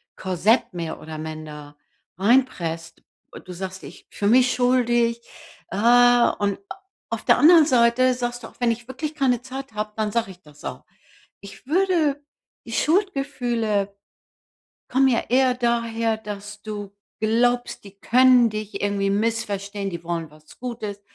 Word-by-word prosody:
Korsett, 190 Hz, +5 st, +1 dB
mehr 170 Hz, -2 st, -5 dB
oder 155 Hz, 0 st, -8 dB
minder, 155 Hz, -2 st, -8 dB, 0.4 s
reinpresst. 185 Hz, -7 st, 0 dB, 0.4 s
Du 185 Hz, -, -9 dB
sagst: 190 Hz, +1 st, -7 dB
„Ich -, -, -12 dB
fühle 205 Hz, +1 st, 0 dB
mich 250 Hz, 0 st, +4 dB
schuldig.“ 240 Hz, -2 st, +2 dB, 0.5 s
Äh, -, -, -5 dB
und 240 Hz, -3 st, +4 dB
a -, -, -8 dB, 0.3 s
auf -, -, -3 dB
der -, -, +5 dB
anderen 325 Hz, 0 st, +7 dB
Seite 255 Hz, -1 st, +3 dB
sagst 245 Hz, -1 st, -4 dB
du: -, -, -7 dB
„Auch -, -, -19 dB
wenn 240 Hz, -1 st, +2 dB
ich 235 Hz, +1 st, -6 dB
wirklich 300 Hz, +4 st, -5 dB
keine 255 Hz, -5 st, +1 dB
Zeit 265 Hz, -1 st, -8 dB
habe, 210 Hz, 0 st, -4 dB
dann 215 Hz, -1 st, -1 dB
sage 230 Hz, -3 st, -1 dB
ich 180 Hz, -, -16 dB
das 150 Hz, -2 st, -18 dB
auch.“ -, -, -7 dB, 0.6 s
Ich 200 Hz, +5 st, -13 dB
würde 320 Hz, -4 st, +1 dB, 0.4 s
die 230 Hz, -, -9 dB
Schuldgefühle 245 Hz, -, 0 dB, 0.9 s
kommen 265 Hz, +1 st, +3 dB
ja 240 Hz, -3 st, +2 dB
eher 255 Hz, +1 st, +3 dB
daher, 230 Hz, -2 st, 0 dB
dass 205 Hz, -1 st, -8 dB
du 205 Hz, -2 st, -7 dB, 0.2 s
glaubst, 240 Hz, +3 st, +1 dB
die 200 Hz, -1 st, -14 dB
können 250 Hz, -1 st, +5 dB
dich 215 Hz, -1 st, -6 dB
irgendwie 200 Hz, -1 st, 0 dB
missverstehen, 205 Hz, -2 st, -2 dB
die 170 Hz, -2 st, -7 dB
wollen 165 Hz, -2 st, -4 dB
was 155 Hz, 0 st, -19 dB
Gutes. 225 Hz, -5 st, -6 dB
230 Hz, 150 wpm, -23 LUFS, 200-250 Hz, 0.9 s, anderen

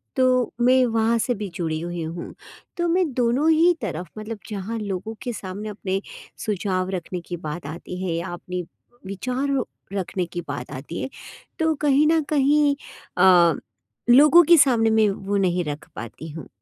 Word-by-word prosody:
तो 255 Hz, -2 st, +2 dB
मैं 255 Hz, +1 st, +5 dB
वहाँ 230 Hz, 0 st, +2 dB
से 245 Hz, +2 st, 0 dB
भी 205 Hz, 0 st, -4 dB
जुड़ी 160 Hz, -2 st, -2 dB
हुई 175 Hz, -1 st, -4 dB
हूँ। 165 Hz, +2 st, -6 dB, 0.4 s
तो 345 Hz, 0 st, +1 dB
मैं 345 Hz, -3 st, +2 dB
दोनों 250 Hz, +6 st, +2 dB
ही 335 Hz, +3 st, +5 dB
तरफ़, 175 Hz, -4 st, -4 dB
मतलब 215 Hz, 0 st, -6 dB
जहाँ 210 Hz, +2 st, -4 dB
लोगों 200 Hz, +1 st, -4 dB
के 245 Hz, -, -3 dB
सामने 205 Hz, +2 st, -6 dB
अपने 195 Hz, -1 st, -3 dB, 0.4 s
सुझाव 190 Hz, -3 st, -1 dB
रखने 180 Hz, -1 st, -4 dB
की 175 Hz, 0 st, -6 dB
बात 155 Hz, -1 st, -6 dB
आती 175 Hz, +3 st, -7 dB
है 175 Hz, -3 st, -1 dB
या 170 Hz, +3 st, -3 dB
अपने 180 Hz, +1 st, -5 dB, 0.4 s
विचार 250 Hz, +8 st, -2 dB, 0.4 s
रखने 185 Hz, -2 st, -2 dB
की 175 Hz, +1 st, -6 dB
बात 140 Hz, -2 st, -5 dB
आती 145 Hz, +4 st, -6 dB
है, -, -, -3 dB, 0.5 s
तो 320 Hz, 0 st, +2 dB
कहीं 290 Hz, 0 st, +4 dB
न 320 Hz, 0 st, +4 dB
कहीं 290 Hz, 0 st, +3 dB, 0.4 s
अ, 180 Hz, -2 st, +6 dB, 0.6 s
लोगों 300 Hz, +7 st, +8 dB
के 340 Hz, +2 st, +6 dB
सामने 235 Hz, -6 st, +4 dB
मैं 220 Hz, -1 st, +4 dB
वो 200 Hz, +1 st, -2 dB
नहीं 180 Hz, -2 st, +1 dB
रख 145 Hz, 0 st, -5 dB
पाती 135 Hz, +7 st, -8 dB
हूँ। 160 Hz, +1 st, -8 dB
205 Hz, 170 wpm, -23 LUFS, 175-255 Hz, 0.6 s, लोगों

